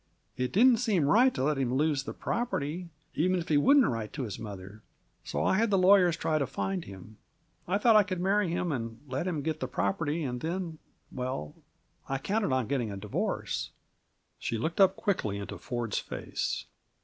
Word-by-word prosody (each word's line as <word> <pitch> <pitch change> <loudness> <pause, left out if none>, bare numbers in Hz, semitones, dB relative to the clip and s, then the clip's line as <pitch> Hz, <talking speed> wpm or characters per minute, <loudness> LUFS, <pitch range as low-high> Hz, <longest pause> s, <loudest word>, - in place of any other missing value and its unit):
It 125 0 -2
didn't 240 +4 +6
seem 205 - +2
right 235 - +5
to - - -1
let 150 0 +1
him 130 -1 0
lose 145 -1 +1
the - - -5
property, 180 -7 -2 0.2
even 185 +3 +2
if 170 - -6
he 150 - +4
wouldn't 275 - +6
write 115 -3 -2
to 140 - -3
his 105 -6 -5
mother. 100 -1 -8 0.4
So 75 +1 -2
I 190 - +3
had 230 0 +2
the 195 - +3
lawyers 185 -3 +5
try 155 -1 0
to 140 - 0
find 180 +7 -3
him. 100 +2 -11 0.5
I 185 +3 +2
thought 225 +1 +5
I 210 - +9
could 190 -3 -3
marry 195 +1 +2
him, 175 0 -1
and 115 -4 -4
let 135 +7 -2
him 160 -6 -2
get 155 0 -2
the 130 - -2
property, 145 - -1
and 125 -3 -3
then 165 -1 -3 0.3
well, 125 - -4 0.6
I 135 - 0
counted 200 +4 -1
on 130 -4 +1
getting 130 -5 -1
a 100 - -5
divorce." 100 +1 -2 0.7
She 115 - -2
looked 165 - -1
up 190 0 +6
quickly 145 - -1
into 100 - -6
Ford's 120 -3 -2
face. - - -4
150 Hz, 195 wpm, -29 LUFS, 120-185 Hz, 0.7 s, I